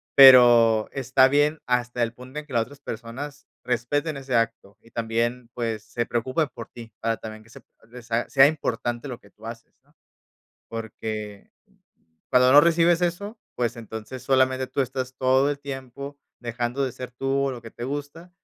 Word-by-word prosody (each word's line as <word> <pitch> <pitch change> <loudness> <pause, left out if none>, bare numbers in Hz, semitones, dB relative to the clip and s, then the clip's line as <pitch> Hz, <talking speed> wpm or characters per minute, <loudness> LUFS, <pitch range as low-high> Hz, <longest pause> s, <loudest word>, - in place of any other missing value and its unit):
pero 120 -5 +8
está 130 0 +4
bien 145 +3 +2
hasta 125 0 0
el 115 0 -2
punto 130 +4 -8
en 150 - -10
que 150 - -12
las 115 - +3
otras 140 +4 -15
personas 140 +4 -7 0.2
respeten 140 +5 -1
ese 135 -2 -3
acto, 115 -3 -1
y 115 - -21
también, 115 +1 -2
pues, 115 -3 -3
se 120 +1 -3
preocupen 130 +7 0
por 115 - -8
ti, 115 -2 -12
para 115 0 0
también 110 0 -9
que 115 - -21
se - - -13 0.3
de 125 +1 -10
sa 115 +1 -2
sea 135 -1 +7
importante 120 -4 -2
lo 125 -3 -7
que 100 - -19
tú 110 - -16
haces, 115 0 -9
¿no? - - -32 0.7
Porque, 110 -2 -6 0.8
cuando 125 0 +5
no 145 - +10
recibes 170 +1 +4
eso, 200 +6 -2 0.2
pues, 120 -2 -1
entonces, 115 +2 -8
solamente 130 0 +2
tú 130 +2 0
estás 130 0 -4
todo 130 +2 +3
el 145 - -3
tiempo 140 0 -7 0.2
dejando 120 +3 -2
de 130 - -3
ser 125 0 -8
tú, 135 +2 0
o - - 0
lo 125 -3 -7
que 115 - -10
te 120 - -7
gusta, 145 +6 -6
125 Hz, 180 wpm, -25 LUFS, 115-140 Hz, 0.8 s, no